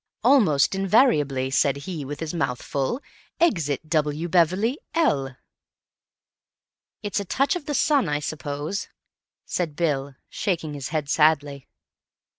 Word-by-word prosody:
"Almost 210 Hz, -, +4 dB
invariably. 180 Hz, -, +2 dB
Said 140 Hz, 0 st, +2 dB
he 150 Hz, +1 st, -6 dB
with 145 Hz, +2 st, -7 dB
his 160 Hz, 0 st, -3 dB
mouth 125 Hz, -7 st, -1 dB
full. 140 Hz, -, -2 dB, 0.4 s
Exit 160 Hz, -, +1 dB
W. 155 Hz, +1 st, 0 dB
Beverley, 185 Hz, -, +2 dB, 0.2 s
L." 135 Hz, -, +1 dB, 1.7 s
"It's 205 Hz, 0 st, -1 dB
a 200 Hz, -, -4 dB
touch 275 Hz, -, +1 dB
of 345 Hz, -5 st, -6 dB
the 295 Hz, -, -1 dB
sun, 280 Hz, -, +2 dB
I 145 Hz, 0 st, 0 dB
suppose," 150 Hz, +5 st, -4 dB, 0.6 s
said 165 Hz, -5 st, -2 dB
Bill, 140 Hz, -5 st, -1 dB
shaking 165 Hz, -6 st, -2 dB
his 140 Hz, -2 st, -5 dB
head 150 Hz, -2 st, -2 dB
sadly. 145 Hz, -2 st, +2 dB
155 Hz, 125 wpm, -24 LUFS, 145-200 Hz, 1.7 s, Almost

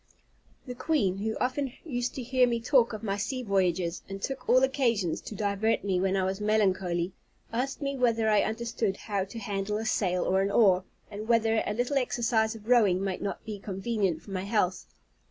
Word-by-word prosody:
The 250 Hz, -, -5 dB
queen, 230 Hz, -, 0 dB
who 220 Hz, +2 st, -2 dB
often 260 Hz, +1 st, -1 dB
used 245 Hz, -5 st, -2 dB
to 260 Hz, -, -4 dB
hear 250 Hz, +1 st, +3 dB
me 235 Hz, -1 st, 0 dB
talk 240 Hz, 0 st, +3 dB
of 215 Hz, -1 st, -7 dB
my 200 Hz, -2 st, -1 dB
sea 255 Hz, +5 st, -3 dB
voyages, 185 Hz, -4 st, 0 dB
and 195 Hz, 0 st, -5 dB
took 260 Hz, +4 st, -5 dB
all 255 Hz, +1 st, +6 dB
occasions 235 Hz, -, +1 dB
to 215 Hz, -, -8 dB
divert 205 Hz, +2 st, 0 dB
me 190 Hz, -2 st, 0 dB
when 190 Hz, +1 st, +1 dB
I 190 Hz, -, +1 dB
was 190 Hz, +2 st, -2 dB
melancholy, 190 Hz, -4 st, +1 dB, 0.4 s
asked 270 Hz, +5 st, -2 dB
me 275 Hz, 0 st, -1 dB
whether 230 Hz, -3 st, +2 dB
I 210 Hz, -1 st, +4 dB
understood 225 Hz, -2 st, -2 dB
how 200 Hz, -3 st, -2 dB
to 200 Hz, -, -10 dB
handle 205 Hz, -1 st, -2 dB
a 220 Hz, -, -4 dB
sail 185 Hz, -4 st, +1 dB
or 190 Hz, +1 st, +2 dB
an 195 Hz, -, +1 dB
oar, 190 Hz, -3 st, +4 dB, 0.3 s
and 210 Hz, +1 st, -6 dB
whether 225 Hz, -1 st, +3 dB
a 210 Hz, -, -1 dB
little 245 Hz, +4 st, 0 dB
exercise 230 Hz, -3 st, 0 dB
of 215 Hz, -1 st, -12 dB
rowing 205 Hz, -7 st, +4 dB
might 190 Hz, -2 st, -2 dB
not 200 Hz, -, -4 dB
be 215 Hz, -2 st, -5 dB
convenient 195 Hz, -4 st, -2 dB
for 200 Hz, -, -12 dB
my 190 Hz, 0 st, -3 dB
health? 190 Hz, -4 st, 0 dB
215 Hz, 200 wpm, -28 LUFS, 195-240 Hz, 0.4 s, all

